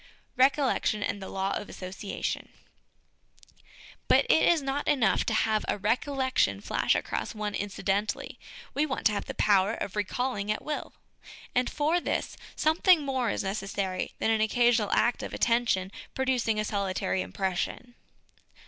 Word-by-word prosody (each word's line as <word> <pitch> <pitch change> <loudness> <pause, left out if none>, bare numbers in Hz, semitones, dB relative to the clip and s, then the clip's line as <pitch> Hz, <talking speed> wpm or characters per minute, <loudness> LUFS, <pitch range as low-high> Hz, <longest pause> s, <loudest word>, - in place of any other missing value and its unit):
Recollection 260 -5 +2
and 200 - -3
the 190 - -7
Law 195 0 -1
of 205 - -5
Association. 190 +2 -5 1.6
But - - +5
it - - +5
is 335 -4 +3
not 275 +1 -2
enough 270 -7 +3
to 225 - +1
have 220 -1 +2
a - - 0
recollection 260 +5 +1
flash - - +1
across - - -3
one 210 -1 -3
incidentally; 205 +1 -2 0.3
we 290 - +1
want 280 -3 -3
to 215 - +6
have 205 - -2
the - - -6
power 205 +1 +3
of 200 - -5
recalling 210 0 -1
at 215 - -3
will: 300 0 -4 0.6
and 250 0 +1
for 310 +4 +1
this, - - -2 0.2
something 320 +1 +4
more 260 -4 0
is - - -1
necessary 195 -1 -3
than 225 - +1
an 220 -1 +2
occasional 230 -1 +3
act 240 - +2
of - - -5
attention 230 -6 +1 0.2
producing 250 -5 +1
a 215 - 0
solitary 190 - -1
impression. 190 - -3
220 Hz, 150 wpm, -28 LUFS, 200-260 Hz, 1.6 s, to